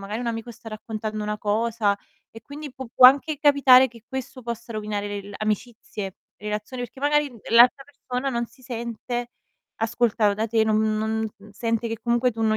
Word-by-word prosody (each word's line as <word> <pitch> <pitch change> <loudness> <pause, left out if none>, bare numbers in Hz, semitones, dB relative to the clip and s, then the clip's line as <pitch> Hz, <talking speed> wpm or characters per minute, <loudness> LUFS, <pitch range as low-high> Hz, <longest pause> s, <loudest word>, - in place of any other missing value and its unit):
magari 210 +4 -5
un 245 - -4
amico 225 +1 -4
sta 230 0 -11
raccontando 215 0 -5
una 210 0 -2
cosa 215 0 +1 0.3
e 225 - -12
quindi 290 +1 -8
pu 260 -1 -8
può 250 - +10
anche 285 +3 +4
capitare 270 -3 +6
che 230 -2 -16
questo 265 -1 -6
possa 235 0 -6
rovinare 210 -1 -3
l'el 205 0 -6
amicizie, 215 -2 -4 0.2
relazioni, 210 +4 -5
perché 245 +2 -8
magari, 295 0 +2
mhmm, 240 - -14
l'altra 245 +4 +6
persona 270 -1 -4
non 235 -1 -1
si 255 +3 -23
sente 240 0 -4 0.5
ascoltav 225 -2 +1
da 220 +2 -1
te, 220 0 +2
non 215 0 +2 0.2
non 220 0 -1
mhmm, 205 +1 -16
sente 230 +2 -2
che 225 -1 -4
comunque 240 +1 +2
tu 225 - -7
non 215 0 +2
230 Hz, 185 wpm, -24 LUFS, 215-250 Hz, 0.5 s, può